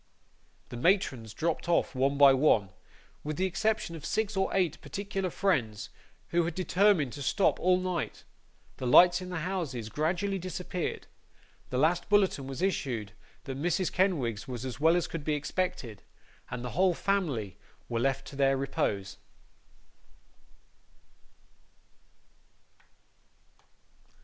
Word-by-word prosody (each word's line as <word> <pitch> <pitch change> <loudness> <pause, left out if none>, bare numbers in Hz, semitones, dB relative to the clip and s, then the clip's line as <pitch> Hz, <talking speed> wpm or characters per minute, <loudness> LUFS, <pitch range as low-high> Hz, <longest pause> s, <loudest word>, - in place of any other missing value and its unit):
The 120 - -7
matrons 130 - +1
dropped 165 +8 -2
off 170 - +2
one 135 +2 +1
by 140 -1 +8
one, 120 -8 +3 0.5
with 150 0 -4
the 185 - +1
exception 210 -1 -1
of 155 - -9
six 215 +5 -1
or 190 0 +1
eight 180 -5 0
particular 195 -2 -3
friends, 120 - -1 0.4
who 175 0 +2
had 165 -1 -3
determined 185 - +2
to 145 - -7
stop 185 +8 +2
all 180 0 +3
night; 185 -3 -3 0.5
the 130 - -3
lights 175 +7 +7
in 180 - -7
the 180 -3 -3
houses 155 - -3
gradually 175 - -1
disappeared; 180 0 -4 0.6
the 125 - -2
last 160 +6 +2
bulletin 195 -9 +2
was 135 +6 -5
issued 125 - -1 0.3
that 135 0 -6
Mrs. 175 +2 0
Kenwigs 145 - 0
was 125 -1 -5
as 130 0 -5
well 160 +3 +4
as 175 - +1
could 165 -3 -6
be 150 0 0
expected; 145 - -3 0.5
and 125 0 -5
the 125 - -4
whole 185 -1 +2
family 145 - -1 0.3
were 115 -1 -2
left 135 +2 0
to - - -11
their 135 -1 +3
repose. 100 -7 -2
160 Hz, 135 wpm, -29 LUFS, 130-185 Hz, 0.6 s, by